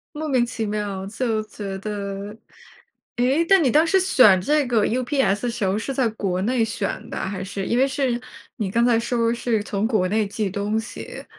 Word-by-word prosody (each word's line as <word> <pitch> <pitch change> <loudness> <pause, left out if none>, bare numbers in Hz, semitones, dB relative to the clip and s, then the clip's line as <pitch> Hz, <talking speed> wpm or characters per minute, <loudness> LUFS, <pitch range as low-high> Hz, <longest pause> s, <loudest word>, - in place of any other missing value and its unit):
莫 310 +1 -4
名 255 -3 +3
其 235 -2 -4
妙 205 -2 -3
就 220 +1 -1
觉 205 -2 -6
得。 200 0 -5 0.8
诶， 265 +7 +2
那 390 +1 +6
你 290 -6 +3
当 305 +6 +4
时 380 +3 +3
选 250 - +5
这 295 +7 +2
个 235 -4 +2
UPS 245 -4 0
的 245 - 0
时 230 -2 -4
候 190 +2 +1
是 250 +5 -3
在 260 -2 +1
国 195 -4 -2
内 235 +1 +1
选 205 -2 -4
的， - - -4
还 190 -1 -3
是？ 195 0 -5
因 235 - +1
为 265 +2 +4
是 265 -3 -1 0.4
你 205 -4 -3
刚 235 +3 +2
才 240 -2 +4
说 230 0 0
是 235 -2 0
从 205 0 -2
国 215 -5 +1
内 210 +2 +1
寄 205 0 -2
东 205 +3 -1
西。 225 - -8
225 Hz, 225 characters per minute, -23 LUFS, 200-250 Hz, 0.8 s, 那